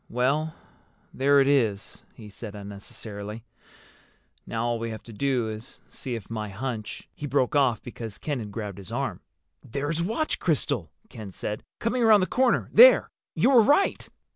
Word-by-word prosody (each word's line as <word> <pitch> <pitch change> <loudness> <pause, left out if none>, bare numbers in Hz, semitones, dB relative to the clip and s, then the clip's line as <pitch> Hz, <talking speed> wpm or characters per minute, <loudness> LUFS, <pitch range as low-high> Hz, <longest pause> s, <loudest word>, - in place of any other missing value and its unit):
"Well, 140 +6 0 0.6
there 140 +2 +4
it 135 - +2
is," 115 -8 +1
he 105 -2 -11
said 105 0 -8
unnecessarily. 100 +1 -7 1.0
"Now 115 0 -2
all 120 -1 0
we 115 0 -3
have 110 -1 -7
to 115 - -11
do 125 0 0
is 110 +2 -8
see 125 -2 -4
if 110 -4 -7
my 110 -2 -4
hunch—" 110 0 -5
He 145 - -6
broke 135 0 +1
off 130 -6 +2
because 115 -3 -7
Ken 145 -4 -3
had 105 -3 -6
grabbed 100 -2 -5
his 95 - -10
arm. - - -3 0.4
"There's 145 +6 -3
Watch 225 - -1
Crystal!" 140 - 0 0.2
Ken 105 -3 -9
said. 105 +3 -5
"Coming 245 +2 -1
around 220 -3 +6
the - - +3
corner 255 +4 +2
there! - - +8 0.2
You 265 - +3
were 245 -4 +8
right!" 290 - +2
120 Hz, 165 wpm, -26 LUFS, 105-145 Hz, 1.0 s, there